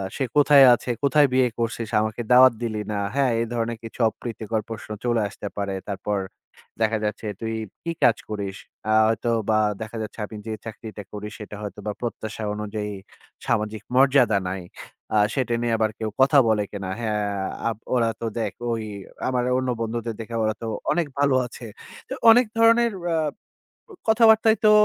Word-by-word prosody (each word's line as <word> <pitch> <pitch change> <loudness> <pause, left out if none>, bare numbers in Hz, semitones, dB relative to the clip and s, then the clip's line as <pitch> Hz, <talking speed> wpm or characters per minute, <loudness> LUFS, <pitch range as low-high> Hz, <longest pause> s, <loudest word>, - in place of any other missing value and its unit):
সে 135 - -1
কোথায় 145 -1 +7
আছে? 120 - -2
কোথায় 145 +1 +5
বিয়ে 130 -1 +4
করছিস? 115 -1 -2
আমাকে 110 +2 -2
দাওয়াত 130 0 +8
দিলি 110 -2 -2
না।" 105 - -2 0.2
হ্যাঁ? 135 -3 +3
এ - - +2
ধরনের 115 0 -2
কিছু 115 - -10
অপ্রীতিকর 110 -1 -4
প্রশ্ন 110 -1 -7
চলে 120 -2 +1
আসতে 105 - -7
পারে। 100 -1 -2 0.2
তারপর 100 +1 -2 0.6
দেখা 110 0 +2
যাচ্ছে, 105 +1 -3
"তুই 115 0 -2 0.3
কি 170 - -2
কাজ 120 -3 +5
করিস?" 100 -2 -4 0.4
আ - - +4
হয়তো 115 +1 0 0.2
বা 110 - +4 0.2
দেখা 110 +1 -6
যাচ্ছে, 110 +1 -7
আমি 110 - -10
যে 110 - -2
চাকরিটা 110 -1 -8
করি, 105 0 -5
সেটা 105 -1 -8
হয়তো 105 0 -7
বা - - 0
প্রত্যাশা 110 -2 -5
অনুযায়ী 105 0 -4 0.6
সামাজিক 105 0 -1
মর্যাদা 130 -5 +5
নাই। 95 0 -4 0.5
আ - - +5 0.2
সেটা 130 -3 0
নিয়ে 120 -1 0
আবার 110 -1 +1
কেউ 110 - -2
কথা 140 +2 +5
বলে 110 -2 +2
কি 100 - -5
না? - - -4
হ্যাঁ, 105 -2 -1 0.4
আ - - +3 0.3
ওরা 115 -2 +3
তো - - -2
দেখ 105 -4 -2 0.2
ঐ - - +1 0.6
আমার 125 -1 +1
অন্য 130 0 -1
বন্ধুদের 115 0 -3
দেখে 115 +1 -7
ওরা 110 0 +1
তো 115 - -4 0.2
অনেক 170 -3 +1
ভালো 140 -2 +3
আছে। 120 0 -10 0.4
হ - - -21 0.2
অনেক 245 +2 +6
ধরনের 230 +1 +5 0.2
আ - - +2 0.9
কথাবার্তাই 220 0 +6
তো - - +8
115 Hz, 175 wpm, -24 LUFS, 110-130 Hz, 0.9 s, দাওয়াত